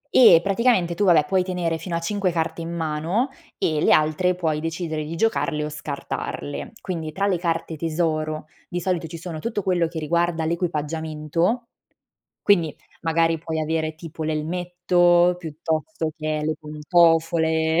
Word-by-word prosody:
E 235 -12 +8
praticamente 195 -3 +2
tu 205 - +1
vabbè 165 -5 +5
puoi 185 +4 +2
tenere 180 -3 -1
fino 170 +1 -4
a - - 0
5 195 +2 0
carte 165 0 -2
in 165 - -5
mano 165 - -1 0.3
e 155 -2 0
le - - +4
altre 155 +4 +2
puoi 160 -4 -1
decidere 160 -1 -3
di 160 +2 -5
giocarle 165 -6 0
o 150 - -3
scartarle. 145 +1 -5
Quindi 165 -5 -4
tra 200 +4 0
le 190 -3 +2
carte 165 -1 -2
tesoro 155 -1 -1 0.2
di 175 - -3
solito 175 -3 -1
ci 165 +1 -7
sono 165 -1 -6
tutto 210 +3 -3
quello 180 -3 +2
che 165 0 -5
riguarda 165 +1 0
l'equipaggiamento, 160 - -1 0.8
quindi 170 -7 +3 0.3
magari 165 0 +2
puoi 160 0 -3
avere 155 0 -1
tipo 160 0 -8
l'elmetto 175 +2 +2
piuttosto 160 - -3
che 155 0 -2
le 155 0 0
pantofole. 160 +1 +2
165 Hz, 150 wpm, -23 LUFS, 155-175 Hz, 0.8 s, E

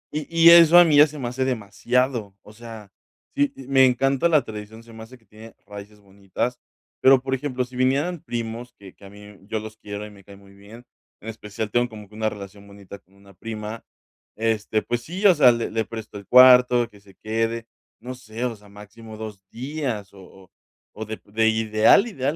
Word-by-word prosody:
Y 150 -2 -4
y 165 0 +6
eso 170 0 +8
a 175 - +9
mí 155 -4 +2
ya 150 +2 +7
se 150 0 -11
me 130 -4 -4
hace 125 +2 -3
demasiado. 120 -1 -2
O 105 - -16
sea, 110 -3 -12 0.4
sí, 145 0 +1
eh, 135 - -11
me 135 -1 +4
encanta 135 +5 +1
la 155 -5 +3
tradición. 110 0 -10
Se 115 0 -16
me 110 - -11
hace 120 +3 -13
que 115 - -32
tiene 110 +1 -15
raíces 105 +1 -12
bonitas, 100 +5 -5 0.4
pero, 135 0 +6
por 135 0 -4
ejemplo, 130 -1 -3
si 125 0 -16
vinieran 140 +7 0
primos 120 +1 -6
que 95 -2 -14
que 100 - -18
a - - -12
mí 100 +1 -15
me 105 -1 -15
yo 110 0 -3
los 110 0 -10
quiero 105 -1 -8
y 105 - -12
me 100 -1 -17
cae 100 +1 -15
muy 100 0 -19
bien. 105 +4 -15 0.4
En 110 - -9
especial, 105 -1 -7
tengo 120 +1 +1
como 105 -2 -12
que 105 - -23
una 110 0 -1
relación 100 0 -11
bonita 100 0 -13
con 95 +1 -31
una 100 0 -20
prima, 110 +2 -8 0.5
este., 110 -1 -1
pues 120 0 -3
sí, 180 - -6
o 195 - +8
sea, 135 -5 +6
le 115 -1 -3
le 110 0 -1
presto 110 -2 -9
el 100 - -16
cuarto, 125 -1 +6
que 100 - -19
se 100 -1 -21
quede. 115 +2 -3 0.3
No 125 +3 -8
sé, 120 -1 -7
o 120 -2 -3
sea, 105 -1 -20
máximo 105 +2 -13
2 105 -3 -9
días 125 -5 -5
o 100 - -15
o 95 -1 -18 0.4
o 110 - -7
de 110 +1 -7
p - - -27
de 110 +1 +2
ideal, 110 - +3
ideal, 145 - -3
115 Hz, 225 wpm, -22 LUFS, 105-125 Hz, 0.5 s, a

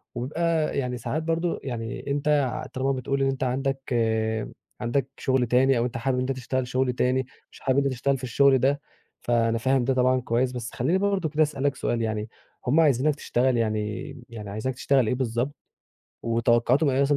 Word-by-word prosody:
وبيبقى 155 +5 0
يعني 125 -2 -1
ساعات 155 +7 -3
برضه 165 +1 -1
يعني 115 -1 -5
أنت 145 +1 -1 0.5
طالما 135 +1 0
بتقول 135 +1 -1
إن 135 - +3
أنت 135 0 -1
عندك 135 +1 -2 0.9
عندك 125 +3 0
شغل 130 -2 +1
تاني 130 +2 +4
أو 120 - +1
أنت 120 - -3
حابب 130 +2 0
إن 125 - 0
أنت 135 - -1
تشتغل 130 0 -2
شغل 130 0 0
تاني، 125 +1 +1 0.3
مش - - -15
حابب 135 0 +1
إن 140 - +4
أنت 140 - 0
تشتغل 135 +2 0
في 130 - -13
الشغل 135 +2 +4
ده، 140 +3 +1 0.4
فأنا 115 -1 +1
فاهم 130 +1 +1
ده 135 - +2
طبعًا 130 0 +2
كويس. 125 +2 0
بس 125 -1 -5
خلّيني 140 +10 +1
برضه 195 -4 0
كده 155 +1 +3
أسألك 140 -2 -1
سؤال 120 -2 -1
يعني، 110 -1 -2 0.4
هُم 145 +6 +4
عايزينك 145 -1 +3
تشتغل 130 -3 +1
يعني 110 +4 -2 0.2
يعني 105 -3 -8
عايزينك 110 +5 -3
تشتغل 135 -2 +2
إيه 125 - +1
بالضبط، 125 +3 -1 0.7
وتوقعاتهم 120 +5 +2
إيه 130 +1 +1
مثلًا 140 +1 +3
130 Hz, 190 wpm, -25 LUFS, 120-140 Hz, 0.9 s, تاني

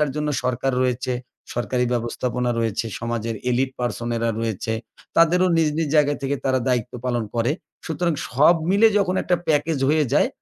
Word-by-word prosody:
জন্য 150 0 -1
সরকার 125 +1 0
রয়েছে। 125 0 -1 0.4
সরকারি 125 +1 0
ব্যবস্থাপনা 120 +1 -1
রয়েছে, 115 0 -1
সমাজের 115 -1 -3
elite 130 +2 +1
person 120 -1 -2
এরা 115 0 0
রয়েছে। 110 -1 -2 0.4
তাদেরও 180 +3 +5
নিজ, 160 -2 +3
নিজ 165 -1 0
জায়গা 145 -1 +4
থেকে 140 +1 -1
তারা 130 -1 +2
দায়িত্ব 125 -2 0
পালন 120 -2 0
করে। 120 +3 +2 0.3
সুতরাং 170 +1 0 0.2
সব 150 +7 +5
মিলে 200 +4 +6
যখন 190 -2 +1
একটা 180 - +2
প্যাকেজ 155 0 +2
হয়ে 155 0 +3
যায়, 150 - +4
130 Hz, 160 wpm, -23 LUFS, 120-155 Hz, 0.4 s, মিলে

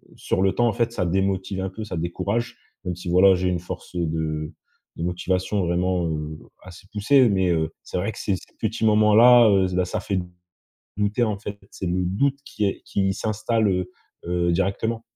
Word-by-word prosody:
sur 95 - -1
le 95 0 +3
temps, 120 0 +3
en 110 - +1
fait, 115 -1 0
ça 90 - -1
démotive 95 +1 -1
un 95 - -2
peu, 110 +4 -7
ça 90 -5 -5
décourage. 100 +7 -2 0.3
Même 90 -1 -2
si, 90 0 -7
voilà, 95 +2 +6
j'ai 90 0 0
une 90 -1 -1
force, 90 +1 -8
heu, 85 -1 0
de 80 -1 -3 0.4
de 85 - -4
motivation, 90 +2 -1
vraiment, 90 0 0
heu, 75 -1 -4 0.3
assez 95 +1 -13
poussée, 125 +5 +4
mais, 95 -2 +1
heu, 80 -1 0
c'est - - -5
vrai 100 +5 -1
que - - -10
ces 100 - 0
ces - - -17
petits 110 0 -1
moments 105 0 +4
là, 120 -1 +8
heu, 95 -2 +4
bah, 90 0 +1
ça - - -3
fait 95 -2 -1 0.8
douter, 105 +4 +1
en 105 -3 -2
fait, 100 0 -7
c'est 95 - -5
le 90 +1 0
doute 135 +10 0
qui 105 -5 -3
est 95 - -3
qui 95 -1 0
s'installe, 110 +1 0
heu 90 -1 -1 0.4
heu, 85 0 0
directement. 100 +5 -1
95 Hz, 205 wpm, -23 LUFS, 90-105 Hz, 0.8 s, là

